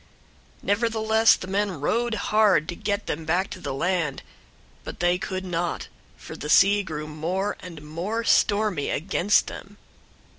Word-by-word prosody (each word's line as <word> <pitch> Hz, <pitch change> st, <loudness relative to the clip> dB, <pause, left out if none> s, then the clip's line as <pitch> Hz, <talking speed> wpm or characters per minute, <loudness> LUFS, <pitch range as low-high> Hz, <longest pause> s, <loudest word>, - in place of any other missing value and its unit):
001:013 -, -, -31 dB
Nevertheless 220 Hz, +1 st, +3 dB
the -, -, -7 dB
men 195 Hz, -3 st, -1 dB
rowed 235 Hz, +10 st, 0 dB
hard 210 Hz, -6 st, +3 dB
to 175 Hz, -, -4 dB
get 205 Hz, +1 st, -2 dB
them 160 Hz, +2 st, -3 dB
back 175 Hz, +5 st, 0 dB
to 185 Hz, -, -7 dB
the 180 Hz, -, -5 dB
land; 165 Hz, +1 st, -1 dB, 0.6 s
but -, -, -8 dB
they 175 Hz, +1 st, +2 dB
could 190 Hz, -1 st, -4 dB
not, 175 Hz, -1 st, -3 dB, 0.3 s
for -, -, -10 dB
the 150 Hz, -, -6 dB
sea 200 Hz, +5 st, +5 dB
grew 155 Hz, -5 st, -5 dB
more 170 Hz, +7 st, -2 dB
and 165 Hz, -4 st, -10 dB
more 180 Hz, +10 st, -3 dB
stormy 205 Hz, -8 st, +2 dB
against 195 Hz, +4 st, +2 dB
them. 205 Hz, +1 st, -10 dB
190 Hz, 155 wpm, -25 LUFS, 165-205 Hz, 0.6 s, sea